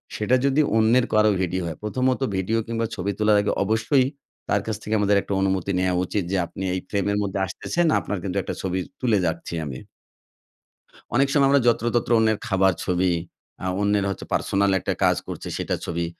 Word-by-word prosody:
সেটা 110 +4 +2
যদি 140 +2 +3 0.2
অন্যের 115 +3 +4
কারো 110 0 +5
ভিডিও 90 +1 -1
হয় 80 - -5
প্রথমত 130 +4 0 0.2
ভিডিও 95 +4 0
কিংবা 115 0 -1
ছবি 100 0 -2
তোলার 105 -1 +4
আগে 100 - 0
অবশ্যই 110 +6 +2 0.4
তার 100 - +2
কাছ 110 - -2
থেকে 110 - -3
আমাদের 105 0 +3
একটা 100 - -4
অনুমতি 95 0 0
নেয়া 90 0 +1
উচিত, 100 +2 -2
যে 100 - +1
আপনি 95 - -7
এই - - -1
ফ্রেমের 100 0 0
মধ্যে 100 -1 -3
আসতেছেন 170 - -2
আপনার 105 - -4
কিন্তু 95 0 -3
একটা - - -5
ছবি 95 0 -1 0.2
তুলে 115 -5 +3
যাচ্ছি 85 0 -3
আমি। 65 -3 -6 1.4
অনেক 135 +2 +4
সময় 140 -2 +4
আমরা 140 0 +4
যত্রতত্র 120 0 +1
অন্যের 110 -1 +2
খাবার 95 -3 +3
ছবি, 90 0 +1 0.5
আ - - -3 0.2
অন্যের 100 -1 +2
হচ্ছে 95 - -5
পার্সোনাল 100 0 +1
একটা - - -2
কাজ - - +4
করছে - - -6
সেটা - - -1
ছবি। 85 0 -2
100 Hz, 185 wpm, -23 LUFS, 95-115 Hz, 1.4 s, কারো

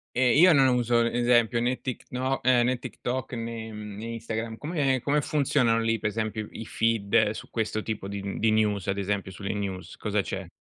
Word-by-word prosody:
Ehm, 125 -1 +4
io 180 +4 +7
non 135 -4 +5
uso, 120 -1 +2
esempio 120 -1 +2
né 125 +1 0
Tikno 130 0 -3
eh, 125 -1 +4
né 125 +1 +1
TikTok 130 +2 -4
né, 115 -1 -5
mhmm 105 -1 -8
né 110 - -6
Instagram. 115 0 -4
Come 145 -5 0
come 145 +3 +1
funzionano 130 -6 +2
lì 115 0 0
per 105 - 0
esempio 110 -1 -3
i 115 - -7
feed 110 -1 +2
su - - -8
questo 110 -1 -2
tipo 105 -3 -4
di 100 -1 -4
mhmm, 100 0 -5
di 110 0 +3
news, 105 -3 +1
ad 95 0 0
esempio 100 -1 -2
sulle 100 +3 -4
news. 100 -3 -5
Cosa 105 -1 -1
c'è? 95 -2 -6
115 Hz, 195 wpm, -27 LUFS, 105-125 Hz, -, io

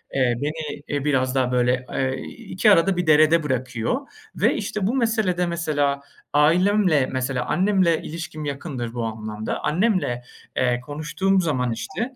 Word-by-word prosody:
eee, 130 -3 +3
beni, 150 -1 -4
eee, 145 0 -2
biraz 130 -2 +1
daha 130 -1 +1
böyle, 125 0 +1
eee, 130 0 0 0.2
iki 215 -1 +2
arada 185 0 +4
bir 180 -2 -1
derede 155 +1 +5
bırakıyor. 130 - -1 0.3
Ve - - +3
işte 205 -2 -2
bu 245 - 0
meselede 220 -8 +1
mesela 150 -5 0 0.3
ailemle, 170 0 +4
mesela 130 -1 -1
annemle 185 -4 +2
ilişkim 160 -1 -6
yakındır 135 -5 -4
bu 120 - -3
anlamda. 110 -1 -4
Annemle, 165 - +1 0.3
eee, 125 -1 +2
konuştuğum 165 +7 0
zaman 130 -8 0
işte 195 - -4
150 Hz, 145 wpm, -23 LUFS, 130-180 Hz, 0.3 s, derede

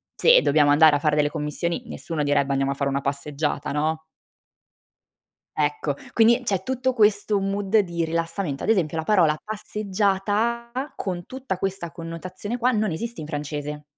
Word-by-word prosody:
Se - - +6
dobbiamo 145 0 +4
andare 150 0 +6
a - - +1
fare 150 0 +1
delle 145 0 +3
commissioni, 160 +7 -3
nessuno 160 -8 -4
direbbe 145 -1 +1
andiamo 135 0 +1
a - - -3
fare 140 0 -1
una 140 0 -1
passeggiata, 140 +1 -2
no? 155 +2 -1 1.6
Ecco 145 -1 0 0.2
quindi 235 +2 +4
c'è 195 -5 0
tutto 260 +3 -1
questo 210 -2 +3
mood 195 +2 +1
di 170 -4 -1
rilassamento, 165 -2 -2
ad - - -2
esempio 170 -8 +2
la 160 - 0
parola 165 -5 +3
passeggiata, 210 +2 -1 0.3
con 175 -3 -4
tutta 260 -8 -5
questa 190 -3 -3
connotazione 180 +7 -6
qua 250 +2 +3
non 215 -4 0
esiste 230 +2 -5
in 150 - -7
francese. 150 0 -5
170 Hz, 160 wpm, -24 LUFS, 150-210 Hz, 1.6 s, Se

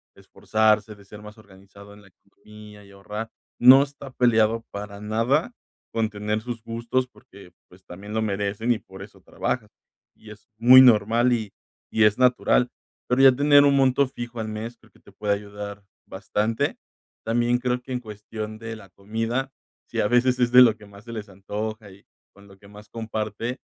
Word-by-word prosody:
esforzarse, 110 -1 0
de 100 -1 -19
ser 105 +1 -13
más 105 +1 -12
organizado 100 0 -16
en 105 - -16
la 100 - -20
economía 105 +2 -16
y 100 - -18
ahorrar 105 +3 -7 0.3
no 130 +3 +8
está 140 -1 -10
peleado 115 -2 +2
para 100 0 -8
nada 115 - 0 0.4
con 110 -1 0
tener 105 +1 -3
sus 120 -1 -6
gustos 115 +3 -2
porque 100 -6 -18 0.2
pues 95 +1 -20
también 100 +4 -10
lo 110 - 0
merecen 105 +2 -2
y 110 - -5
por 95 0 -14
eso 100 -1 -13
trabajas 110 +4 -4 0.4
y 110 - -17
es 105 +3 -16
muy 125 +3 +8
normal 120 0 +4
y 110 -4 -3 0.4
y 110 - +2
es 105 0 +4
natural, 125 -1 +2 0.4
pero 125 +2 +2
ya 135 -1 +8
tener 145 +2 +5
un 140 -1 +4
monto 135 0 +3
fijo 120 -2 -8
al 110 - -5
mes, 110 +2 -6
creo 110 -2 -25
que - - -25
te 100 - -19
puede 105 +1 -1
ayudar 100 0 -9 0.2
bastante. 105 +3 -2 0.5
También 120 +2 +1
creo 125 0 -2
que 130 +1 -8
en 125 - -2
cuestión 110 0 -8
de 115 0 -7
la 100 -3 -14
comida, 115 +7 -4 0.4
si - - -2
a - - +1
veces 125 +1 +2
es 120 -1 +2
de 125 +1 +8
lo 115 -3 +6
que 105 -1 -16
más 100 +2 -16
se 115 - -9
les 110 -2 -7
antoja 105 +2 -6
y 95 +1 -18 0.3
con 100 +1 -19
lo 95 - -17
que 100 - -18
más 105 +1 -15
comparte 110 +2 -5
110 Hz, 190 wpm, -24 LUFS, 105-120 Hz, 0.5 s, no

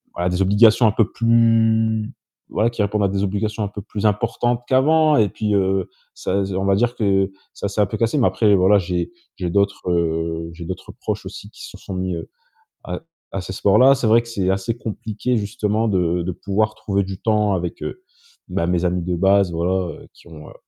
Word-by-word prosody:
voilà 90 +1 0
des 90 +1 -1
obligations 110 +4 +5
un - - +3
peu 110 0 +1
plus 115 -1 +2 0.4
voilà, 110 +2 +1
qui 115 -2 -4
répondent 105 +1 0
à - - +3
des 100 +1 -1
obligations 105 +2 -2
un - - -1
peu 100 0 -8
plus 105 +1 -5
importantes 120 +3 0
qu'avant 155 +3 +4
et 105 -3 +3
puis, 105 +2 -1
heu, 95 -1 0 0.3
ça, 100 +1 -1
z 95 - -5
on 95 +1 -1
va 100 0 +3
dire 120 +4 +1
que 95 -4 +1 0.2
ça - - -4
c'est 105 +1 0
un 105 - +3
peu - - -4
cassé, 115 +5 0
mais 125 - +4
après 105 -3 +3
voilà, 95 +2 +5
j'ai 90 - -3 0.3
j'ai 90 -2 -2
d'autres, 100 -1 0
heu, 80 -1 -1
j'ai 85 +1 -9
d'autres 90 +1 -7
proches - - -4
aussi - - -9
qui - - -11
se - - -12
sont - - -9
mis, 90 -1 -2
heu, 80 - -7 0.6
à 90 - -5 0.3
à 100 - -2
ces 95 +1 -7
sports-là. 110 +8 +5
C'est 120 - -1
vrai 115 +2 +5
que - - -15
c'est 95 -5 -1
assez 100 +5 -2
compliqué 115 +2 -3
justement 105 +1 -1
de 90 -4 +1
de 90 - -2
pouvoir 105 +4 -1
trouver 100 -1 -1
du 95 0 -7
temps 105 -2 +2
avec, 90 -2 -3
heu, 370 - -6 0.5
ben, 85 - -1
mes 90 0 0
amis 90 0 0
de 90 0 -1
base, 95 +1 +3
voilà, 90 +1 -1
heu, - - -15
qui - - -20
ont 75 -2 -12
heu, - - -13
100 Hz, 220 wpm, -21 LUFS, 90-110 Hz, 0.6 s, obligations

